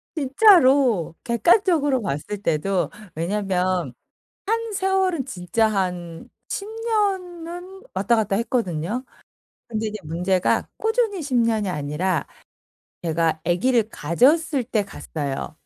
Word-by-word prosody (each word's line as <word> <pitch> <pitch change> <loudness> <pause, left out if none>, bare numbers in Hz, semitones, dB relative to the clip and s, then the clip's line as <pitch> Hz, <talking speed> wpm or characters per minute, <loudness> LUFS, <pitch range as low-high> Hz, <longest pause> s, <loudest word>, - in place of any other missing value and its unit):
진짜로 270 - +4
객관적으로 290 - +3
봤을 200 +5 -3
때도 170 0 0 0.3
왜냐면 180 -4 -1 0.5
한 455 0 -1
세월은 380 -6 +1
진짜 195 0 0
한 180 -4 -3 0.2
10 400 - -3
년은 385 -5 -3
왔다 200 +5 +2
갔다 205 -3 0
했거든요. 225 - -1 0.6
근데 220 -1 -3
이제 215 - -6
문제가 180 +4 0
꾸준히 445 -5 0
10 275 -4 -3
년이 225 -4 +2
아니라 155 +3 -1 0.8
제가 160 -1 0
아기를 220 +6 +2
가졌을 265 - +2
때 215 -4 -1
갔어요. 150 -5 -5
225 Hz, 225 characters per minute, -23 LUFS, -, 0.8 s, 진짜로